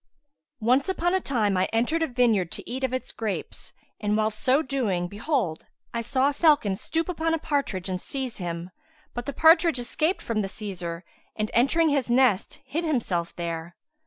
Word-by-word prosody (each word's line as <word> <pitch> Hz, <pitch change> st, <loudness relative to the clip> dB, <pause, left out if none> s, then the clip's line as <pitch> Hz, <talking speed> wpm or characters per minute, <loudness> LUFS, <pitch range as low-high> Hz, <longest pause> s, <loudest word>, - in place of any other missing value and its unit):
[FN#156] -, -, -2 dB
Once 260 Hz, +7 st, +4 dB
upon 350 Hz, -1 st, +1 dB
a 380 Hz, -, +3 dB
time 215 Hz, -, +1 dB
I 185 Hz, -, +3 dB
entered 245 Hz, +9 st, +1 dB
a 325 Hz, -, +2 dB
vineyard 230 Hz, -8 st, +2 dB
to -, -, -7 dB
eat 260 Hz, +2 st, -4 dB
of 260 Hz, -, +1 dB
its 255 Hz, 0 st, -3 dB
grapes; 220 Hz, -4 st, -4 dB, 0.3 s
and, 210 Hz, 0 st, 0 dB
whilst 215 Hz, 0 st, 0 dB
so 270 Hz, +4 st, +3 dB
doing 220 Hz, -, -1 dB
behold, 205 Hz, -, -2 dB, 0.3 s
I 235 Hz, -, -1 dB
saw 260 Hz, +3 st, +1 dB
a 290 Hz, -, +1 dB
falcon 290 Hz, -, +3 dB
stoop 325 Hz, +10 st, -2 dB
upon 325 Hz, -2 st, 0 dB
a -, -, -1 dB
partridge 275 Hz, -, -1 dB
and 185 Hz, -1 st, -2 dB
seize 265 Hz, -4 st, -4 dB
him; 175 Hz, 0 st, -5 dB, 0.4 s
but 240 Hz, +2 st, -5 dB
the -, -, -1 dB
partridge 325 Hz, 0 st, +5 dB
escaped 310 Hz, +8 st, 0 dB
from 225 Hz, -2 st, -1 dB
the 195 Hz, -, -2 dB
seizer 180 Hz, -5 st, -5 dB, 0.3 s
and, 215 Hz, 0 st, -2 dB
entering 310 Hz, +7 st, +4 dB
his 280 Hz, -4 st, 0 dB
nest, 240 Hz, -5 st, +2 dB
hid 330 Hz, +4 st, -2 dB
himself 220 Hz, -, -1 dB
there. 170 Hz, 0 st, -5 dB
240 Hz, 190 wpm, -26 LUFS, 195-290 Hz, 0.4 s, partridge